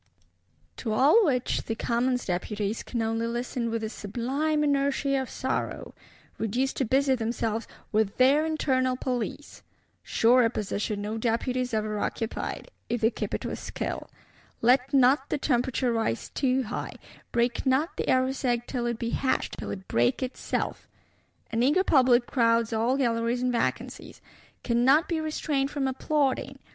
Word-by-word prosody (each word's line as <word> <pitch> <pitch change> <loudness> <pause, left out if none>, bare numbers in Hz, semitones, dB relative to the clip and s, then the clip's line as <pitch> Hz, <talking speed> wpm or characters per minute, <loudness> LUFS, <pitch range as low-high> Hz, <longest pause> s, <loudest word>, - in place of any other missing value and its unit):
To 220 -3 -2
all 290 - +5
which 250 -3 0
the 225 - -2
Commons 245 +2 0
Deputies 205 +4 -2
can 235 -2 -3
only 225 +1 -1
listen 240 0 -2
with 225 0 -2
a 220 - -2
sublime 270 +9 -1
inertia 275 -1 +1
of 260 - -6
sorrow; 260 0 -3 0.5
reduced 245 +5 -1
to 265 - +1
busy 270 +3 +3
themselves 230 -2 -2 0.2
"with 215 -2 +1
their 275 +4 +5
internal 260 -5 +1
police." 250 +3 -4 0.4
Surer 235 0 +4
position 205 -1 -3
no 215 +2 -3
Deputies 250 +2 -1
ever 215 -1 -1
occupied; 225 - -4 0.2
if 240 0 -1
they 225 +1 +4
keep - - -3
it - - -5
with - - -4
skill. - - -5 0.5
Let 250 +3 +4
not 270 0 +4
the - - 0
temperature 250 -2 0
rise 225 - -1
too 265 -1 +1
high; 215 - -5 0.4
break 235 0 +1
not 280 +7 +2
the - - -2
Eros 260 +1 +1
egg 240 -2 +1
till 245 -3 -2
it 235 -1 -2
be 230 0 -3
hatched, 260 -1 -1
till - - -5
it 190 -1 -6
break 120 - +1
itself! 255 - -3 0.6
An 230 0 0
eager 295 +9 +4
public 255 -7 +4
crowds 230 -2 +2
all 230 +4 +1
Galleries 235 -1 0
and 250 - +1
vacancies! 235 - -3 0.4
"cannot 260 +6 +3
be 330 -2 -1
restrained 300 -3 -1
from 280 -2 -1
applauding." 270 +1 0
250 Hz, 155 wpm, -27 LUFS, 230-270 Hz, 0.6 s, all